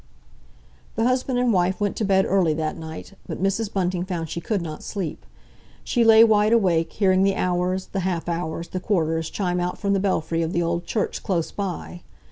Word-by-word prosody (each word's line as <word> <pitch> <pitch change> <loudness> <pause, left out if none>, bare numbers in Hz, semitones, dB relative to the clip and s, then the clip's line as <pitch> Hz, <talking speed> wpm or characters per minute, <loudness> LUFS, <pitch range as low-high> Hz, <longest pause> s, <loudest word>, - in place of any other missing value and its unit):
The 225 - 0
husband 255 +1 +1
and 245 -2 +2
wife 180 0 +1
went 205 -1 0
to - - -1
bed 190 -1 +3
early 180 -5 +2
that 155 0 -2
night, 160 +4 -8
but - - -4
Mrs. 195 +3 0
Bunting 180 -2 -1
found 175 -4 -4
she 170 - -4
could 205 +4 -1
not 155 -2 -6
sleep. 190 -7 -5 0.6
She 240 - +1
lay 225 0 +8
wide 215 -1 +4
awake, 175 -7 +2
hearing 190 -2 +3
the 195 0 +3
hours, 180 +1 0
the 195 - -2
half 180 -3 -2
hours, 170 -1 -3
the 185 - -3
quarters 165 -4 0
chime 180 -3 -1
out 180 0 -2
from 200 -1 0
the 195 - +2
belfry 165 -4 0
of 165 +1 -2
the 175 - +1
old 170 +1 -1
church 215 - -2
close 170 -4 -1
by. 180 -3 -5
185 Hz, 200 wpm, -23 LUFS, 170-200 Hz, 0.6 s, lay